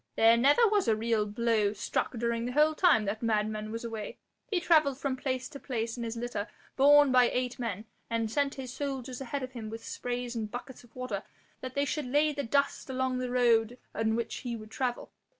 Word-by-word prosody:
There 225 +1 +6
never 285 - +5
was 415 -2 +2
a 220 - +4
real 220 -1 0
blow 215 -1 +1
struck 205 0 -2
during 235 0 -1
the 250 - -3
whole 305 +2 +4
time 310 - +4
that 205 +2 -3
madman 215 -1 -1
was 230 +1 -5
away. 220 -3 -5 0.3
He 390 -5 +1
travelled 310 -6 +3
from 275 -2 -2
place 255 -1 -2
to 280 - -9
place 230 -4 -3
in 240 - -6
his 230 0 -4
litter 235 -3 -3 0.3
borne 290 0 +6
by 250 -1 +5
eight 250 0 -2
men, 220 -3 -3 0.2
and 230 -1 -1
sent 285 +2 0
his 255 -2 -6
soldiers 265 -3 -4
ahead 270 +1 -3
of 255 - -5
him 230 -4 -7
with 225 +1 -8
sprays 245 0 -4
and 220 -2 -3
buckets 245 +3 -8
of 240 - -21
water 255 -6 -3 0.4
that 255 0 -7
they 280 0 +2
should 295 -1 -2
lay 295 +3 +2
the 285 - -2
dust 280 +3 0
along 260 -1 -1
the 250 -1 -2
road 240 -1 +3 0.2
on 220 0 0
which 235 0 -3
he 245 -3 -4
would 215 -1 -10
travel. 250 -1 -3
245 Hz, 215 wpm, -30 LUFS, 225-270 Hz, 0.4 s, There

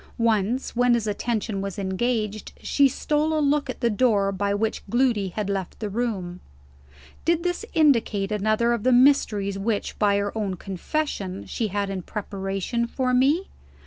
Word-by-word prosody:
Once, 230 +2 0
when 245 0 +4
his 230 -2 -1
attention 215 -1 -2
was 195 -2 -5
engaged, 215 +2 -2
she 280 -1 +4
stole 305 +3 0
a - - +2
look 290 -1 +1
at 255 - -5
the 235 - +3
door 205 -3 +2
by 200 +1 -1
which 215 +2 -1
Gloody 240 -4 +2
had 200 +2 -3
left 195 -3 -3
the 210 -2 -4
room. 195 -6 -3 0.8
Did 335 +1 +1
this 355 +3 -1
indicate 230 -10 +3
another 215 +3 +2
of 235 - -1
the 255 - +2
mysteries 215 -7 +3
which, 210 +1 -2
by 205 -1 +3
her 200 +1 -2
own 205 -4 -2
confession, 195 - -3
she 225 - -2
had 200 0 -2
in 190 -1 -3
preparation 195 +4 -3
for 255 +1 -1
me? 285 +9 +3
215 Hz, 165 wpm, -24 LUFS, 200-250 Hz, 0.8 s, when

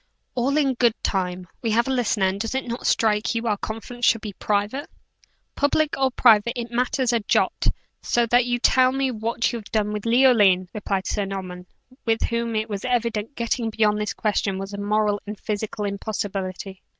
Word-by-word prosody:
"All 265 +4 +1
in 275 -3 +2
good 240 -2 +2
time. 180 -2 -2
We 230 - -1
have 235 +3 +2
a - - 0
listener, 230 -5 +1
and 190 +1 -1
does 225 +3 -3
it 265 - -1
not 235 +1 -3
strike 220 +1 +2
you 230 +1 -2
our 215 -2 +2
conference 225 +4 -7
should 230 -1 +4
be 210 -2 -6
private!" 210 +9 -1 0.6
"Public 295 +2 +1
or 265 -1 +2
private, 235 -2 +4
it 235 0 -5
matters 250 +1 +1
not 235 -1 +1
a - - -20
jot, - - +1 0.3
so 240 0 +1
that 240 +1 +3
you 245 0 +1
tell 255 +1 +4
me 270 0 0
what 230 +1 -1
you've 225 -3 -7
done 210 -1 0
with 210 +1 -4
Leoline," 220 -7 +4
replied 195 -2 -2
Sir 205 - -1
Norman, 185 -2 -6 0.4
with 225 -1 +1
whom 235 -1 -1
it 215 0 0
was 205 -3 -5
evident 235 -1 -1
getting 235 0 -1
beyond 210 -1 +1
this 210 - -3
question 205 -2 0
was 195 +1 -6
a 200 - -5
moral 205 0 +1
and 210 0 -6
physical 210 0 -3
impossibility. 195 -2 -4
220 Hz, 195 wpm, -23 LUFS, 205-240 Hz, 0.6 s, should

